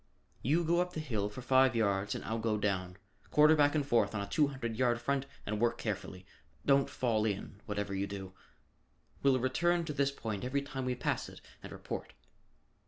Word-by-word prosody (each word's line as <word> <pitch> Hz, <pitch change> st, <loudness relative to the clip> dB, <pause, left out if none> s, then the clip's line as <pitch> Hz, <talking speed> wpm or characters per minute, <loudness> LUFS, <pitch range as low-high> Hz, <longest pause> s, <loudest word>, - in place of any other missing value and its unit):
You 155 Hz, +8 st, +2 dB
go 170 Hz, +2 st, +2 dB
up 180 Hz, 0 st, -3 dB
the 160 Hz, -, -3 dB
hill 110 Hz, -9 st, -2 dB
for 115 Hz, +4 st, -8 dB
five 130 Hz, 0 st, +4 dB
yards 100 Hz, -2 st, +1 dB
and -, -, -6 dB
I'll 110 Hz, +2 st, -2 dB
go 110 Hz, -1 st, 0 dB
down. 95 Hz, -3 st, -1 dB, 0.3 s
Quarter 150 Hz, +1 st, +6 dB
back 145 Hz, 0 st, +4 dB
and 145 Hz, -2 st, +1 dB
forth 115 Hz, -6 st, +2 dB
on 100 Hz, -, -1 dB
a -, -, -3 dB
two 145 Hz, +9 st, +3 dB
hundred 125 Hz, -5 st, -4 dB
yard 120 Hz, -1 st, +2 dB
front 135 Hz, +2 st, -1 dB, 0.2 s
and 105 Hz, 0 st, -2 dB
work 120 Hz, +1 st, +2 dB
carefully. 100 Hz, -3 st, -4 dB, 0.4 s
Don't 140 Hz, -1 st, +4 dB
fall 115 Hz, -4 st, 0 dB
in, 100 Hz, -1 st, -3 dB
whatever 105 Hz, -1 st, -2 dB
you 100 Hz, +1 st, -1 dB
do. 95 Hz, -1 st, -7 dB, 0.9 s
We'll 135 Hz, -2 st, +4 dB
return 170 Hz, +7 st, +1 dB
to 150 Hz, -, -3 dB
this 140 Hz, -1 st, +2 dB
point 110 Hz, -7 st, -5 dB
every 140 Hz, +3 st, -1 dB
time 135 Hz, -2 st, -5 dB
we 125 Hz, 0 st, 0 dB
pass -, -, -1 dB
it -, -, -12 dB, 0.2 s
and -, -, -9 dB
report." -, -, -6 dB
120 Hz, 200 wpm, -32 LUFS, 105-140 Hz, 0.9 s, Quarter